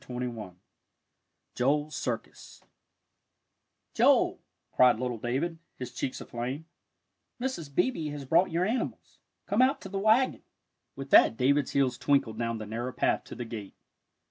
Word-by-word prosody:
XXI 120 Hz, -7 st, -6 dB, 1.0 s
JOEL'S 145 Hz, +4 st, 0 dB
CIRCUS 120 Hz, -3 st, -5 dB, 1.3 s
"Joel," -, -, +3 dB, 0.3 s
cried 125 Hz, -3 st, +5 dB
little 125 Hz, -2 st, -3 dB
David, 145 Hz, +9 st, -2 dB, 0.2 s
his 125 Hz, -1 st, -7 dB
cheeks 125 Hz, -, -3 dB
aflame, 130 Hz, +6 st, -5 dB, 0.7 s
"Mrs. 240 Hz, -, -3 dB
Beebe 205 Hz, -12 st, +1 dB
has 145 Hz, -2 st, -6 dB
brought 165 Hz, +7 st, +3 dB
your 170 Hz, +2 st, 0 dB
animals. 235 Hz, +5 st, -3 dB, 0.3 s
Come 210 Hz, +4 st, +2 dB
out 265 Hz, +2 st, +3 dB
to 195 Hz, -, -8 dB
th' 195 Hz, 0 st, -3 dB
wagon." 220 Hz, +5 st, +3 dB, 0.5 s
With 135 Hz, 0 st, -8 dB
that 110 Hz, -, +7 dB
David's 140 Hz, +2 st, +2 dB
heels 130 Hz, -3 st, +1 dB
twinkled 130 Hz, -6 st, +1 dB
down 115 Hz, -1 st, -1 dB
the 110 Hz, -, -6 dB
narrow 115 Hz, +4 st, -4 dB
path -, -, +1 dB
to -, -, -9 dB
the 120 Hz, -, -5 dB
gate. 110 Hz, -4 st, -8 dB
135 Hz, 140 wpm, -29 LUFS, 120-165 Hz, 1.3 s, that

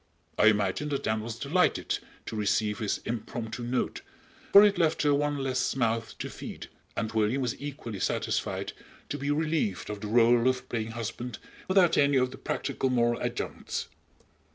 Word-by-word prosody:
I 110 Hz, -, +5 dB
imagine 105 Hz, +6 st, +2 dB
that 140 Hz, -2 st, -2 dB
Anne 110 Hz, 0 st, +1 dB
was 115 Hz, +1 st, -5 dB
delighted 150 Hz, +8 st, +1 dB, 0.3 s
to -, -, -5 dB
receive 105 Hz, 0 st, +1 dB
his 105 Hz, -3 st, -1 dB
impromptu 115 Hz, 0 st, -4 dB
note, 120 Hz, +1 st, -1 dB, 0.5 s
for 200 Hz, -, +10 dB
it 200 Hz, -3 st, +4 dB
left 160 Hz, -2 st, +2 dB
her 145 Hz, -1 st, +4 dB
one 145 Hz, 0 st, +1 dB
less 130 Hz, -2 st, 0 dB
mouth 115 Hz, -3 st, 0 dB
to -, -, -4 dB
feed; -, -, -8 dB, 0.3 s
and 110 Hz, -, -1 dB
William 110 Hz, +5 st, +1 dB
was 120 Hz, -, -1 dB
equally 140 Hz, -8 st, -6 dB
satisfied -, -, -1 dB, 0.4 s
to 145 Hz, -, -3 dB
be 140 Hz, +1 st, -2 dB
relieved 150 Hz, -, 0 dB
of 105 Hz, -1 st, -6 dB
the 105 Hz, -, -4 dB
rôle 120 Hz, +2 st, +5 dB
of 130 Hz, 0 st, -2 dB
playing 115 Hz, -1 st, -3 dB
husband 115 Hz, +1 st, -5 dB, 0.3 s
without 190 Hz, -2 st, +4 dB
any 140 Hz, -1 st, +4 dB
of 125 Hz, 0 st, +2 dB
the -, -, -10 dB
practical 130 Hz, -, -1 dB
moral 120 Hz, -1 st, +2 dB
adjuncts. -, -, -3 dB
120 Hz, 170 wpm, -28 LUFS, 110-145 Hz, 0.5 s, for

